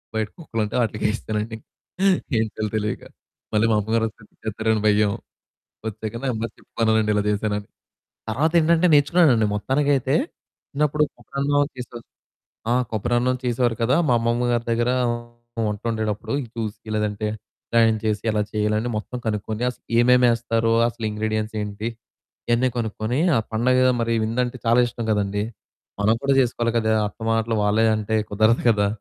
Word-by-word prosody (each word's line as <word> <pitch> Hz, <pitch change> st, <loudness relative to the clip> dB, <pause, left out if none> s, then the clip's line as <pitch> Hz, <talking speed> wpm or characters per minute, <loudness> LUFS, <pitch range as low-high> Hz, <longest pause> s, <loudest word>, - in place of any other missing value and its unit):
బయట 110 Hz, -1 st, 0 dB
కుక్కలు 140 Hz, -10 st, -4 dB
ఉంటే 105 Hz, -, -6 dB
వాటిలికేసేసానండి 110 Hz, 0 st, -2 dB
ఇంక. -, -, -21 dB, 0.7 s
ఏం -, -, +3 dB
చేయాలో 110 Hz, 0 st, -3 dB
తెలియక. 105 Hz, 0 st, -2 dB, 0.5 s
మళ్ళీ 105 Hz, +1 st, +3 dB
మా -, -, +3 dB
అమ్మగారు 110 Hz, +2 st, 0 dB
వస్తే 110 Hz, 0 st, -13 dB, 0.2 s
తిడతారేమో 110 Hz, +1 st, 0 dB
అని 110 Hz, -, -1 dB
భయం. 105 Hz, 0 st, +3 dB, 0.8 s
వచ్చాక 110 Hz, +1 st, -5 dB
నెమ్మదిగా 115 Hz, -3 st, -1 dB
చెప్పుకున్నానండి 110 Hz, -2 st, 0 dB
ఇలా 105 Hz, -, +2 dB
చేశానని, 105 Hz, -1 st, -1 dB, 0.6 s
తర్వాత 150 Hz, +9 st, +1 dB
ఏంటంటే 165 Hz, +2 st, +3 dB
నేర్చుకున్నానండి 145 Hz, -6 st, +4 dB
మొత్తానికైతే 135 Hz, +4 st, +1 dB, 0.6 s
చిన్నప్పుడు 150 Hz, +1 st, +1 dB
కొబ్బరన్నం 145 Hz, +1 st, 0 dB
చేసే 125 Hz, -1 st, -7 dB, 0.7 s
ఆ! -, -, +3 dB, 0.2 s
కొబ్బరి 115 Hz, +2 st, -1 dB
అన్నం 125 Hz, +1 st, +1 dB
చేసేవారు 120 Hz, -1 st, +1 dB
కదా! 125 Hz, +4 st, +3 dB
మా -, -, +4 dB
అమ్మమ్మ 120 Hz, +1 st, 0 dB
గారి 120 Hz, 0 st, 0 dB
దగ్గర 120 Hz, +1 st, +1 dB, 0.8 s
వంట 105 Hz, 0 st, -3 dB
వండేటప్పుడు 110 Hz, -2 st, -2 dB, 0.2 s
చూసి 110 Hz, 0 st, -5 dB
లేదంటే 105 Hz, 0 st, -1 dB, 0.7 s
న్ -, -, -1 dB
చేసి 105 Hz, -2 st, 0 dB
ఎలా 105 Hz, -, 0 dB
చేయాలి 105 Hz, 0 st, +1 dB
అని 120 Hz, +3 st, -2 dB
మొత్తం 110 Hz, +4 st, -4 dB
కనుక్కొని 110 Hz, +1 st, -2 dB
అసలు 125 Hz, -, -15 dB, 0.2 s
ఏమేమి 125 Hz, +1 st, +5 dB
ఎస్తారో, 115 Hz, -1 st, 0 dB
అసలు 115 Hz, -1 st, -5 dB
ఇంగ్రీడియెంట్స్ 110 Hz, +1 st, -2 dB
ఏంటి 105 Hz, +2 st, -4 dB, 0.6 s
ఇయన్నీ 120 Hz, +2 st, +3 dB
కొనుక్కొని, 110 Hz, +1 st, -2 dB, 0.2 s
ఆ -, -, +4 dB
పండగ 130 Hz, +3 st, +3 dB
మరి 115 Hz, 0 st, 0 dB
వింద 115 Hz, +3 st, -2 dB
అంటే 125 Hz, +1 st, -5 dB
చాలా 115 Hz, +2 st, +4 dB
ఇష్టం 120 Hz, -1 st, -5 dB
కదండీ. 105 Hz, -1 st, 0 dB, 0.6 s
మనం 105 Hz, +2 st, +4 dB
కూడా 140 Hz, 0 st, +2 dB
చేసుకోవాలి 120 Hz, -2 st, 0 dB
కదా! 110 Hz, -1 st, +1 dB, 0.2 s
అత్త 105 Hz, -, -19 dB
మాటలు 115 Hz, 0 st, +1 dB
వాళ్ళే 105 Hz, +2 st, +3 dB
అంటే 110 Hz, +1 st, -1 dB
కుదరదు 110 Hz, +3 st, +3 dB
కదా! 105 Hz, -3 st, +3 dB
115 Hz, 150 wpm, -23 LUFS, 105-120 Hz, 0.8 s, ఏమేమి